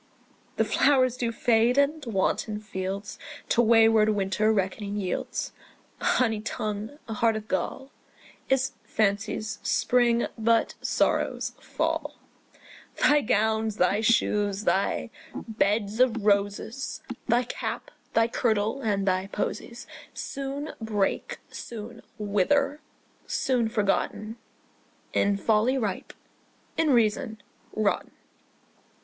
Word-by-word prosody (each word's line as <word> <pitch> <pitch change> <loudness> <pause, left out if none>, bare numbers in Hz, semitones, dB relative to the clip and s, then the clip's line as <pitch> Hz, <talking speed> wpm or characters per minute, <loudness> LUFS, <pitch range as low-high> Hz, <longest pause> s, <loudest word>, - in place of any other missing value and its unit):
The - - +2
flowers 255 -3 +3
do 240 -2 -1
fade; 235 +2 +3
and 290 +2 +2
wanton 210 0 0
fields 200 -1 -5 0.3
To 240 - +4
wayward 225 -1 +5
winter 210 +1 +1
reckoning 200 0 -1
yields: 195 -3 -3 0.5
A - - -5
honey 225 -4 +2
tongue, 215 +4 -4
a 225 - -4
heart 225 +1 +2
of 215 0 -5
gall, 265 +9 -3 0.6
Is 265 0 +2
fancy's 215 +1 -1
spring, 240 -1 +2
but 230 +1 +2
sorrow's - - 0
fall. - - -2 0.8
Thy 295 0 +5
gowns, 220 -1 +1
thy 190 +4 +2
shoes, 210 -3 +2
thy 200 +2 0 0.2
beds 210 0 -1
of 235 -4 +3
roses, 205 +5 0 0.2
Thy 240 +1 +3
cap, 240 - -5 0.2
thy 225 0 +5
kirtle, 225 +1 0
and 200 -4 0
thy 185 0 +1
posies 235 +4 -4 0.3
Soon 275 +2 -4
break, 210 -3 -1
soon 230 0 -8 0.2
wither, 275 +9 +1 0.5
soon 245 -4 +1
forgotten, 215 +1 -1 0.8
In 200 0 +2
folly 220 +5 +2
ripe, 210 -7 -3 0.6
in 325 -1 +2
reason 225 -2 +2 0.3
rotten. 215 -2 0
220 Hz, 105 wpm, -27 LUFS, 205-240 Hz, 0.8 s, wayward